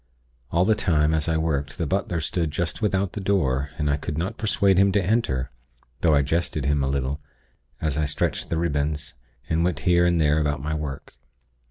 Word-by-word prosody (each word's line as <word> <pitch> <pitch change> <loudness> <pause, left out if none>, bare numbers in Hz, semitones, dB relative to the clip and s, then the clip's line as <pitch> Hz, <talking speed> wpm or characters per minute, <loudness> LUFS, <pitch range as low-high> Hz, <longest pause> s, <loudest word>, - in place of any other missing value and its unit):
All 85 +2 +2
the 110 - +4
time, 80 -6 +2
as 80 0 0
I 80 - +2
worked, 75 -3 -1
the 85 - -1
butler 95 +2 -1
stood 80 +1 -1
just 80 +4 -3
without 100 -3 0
the 105 - -4
door, 70 -9 +1
and 75 - -1
I 70 0 +2
could 75 - -5
not 95 +7 -2
persuade 100 -3 +3
him 100 0 +5
to 100 -3 +2
enter; 70 - 0 0.5
though 80 -3 +4
I 70 - +4
jested 80 -1 -1
him 70 0 +2
a - - +1
little, 70 +1 -2 0.6
as 75 -1 -1
I 75 - +2
stretched 70 - -1
the 80 - -1
ribbons, 75 -2 -1 0.3
and 80 +1 +1
went 85 -6 0
here 85 +2 +4
and 85 -1 +2
there 75 0 +3
about 75 -2 0
my 75 +3 -3
work. 75 -3 -5
80 Hz, 205 wpm, -24 LUFS, 75-90 Hz, 0.6 s, him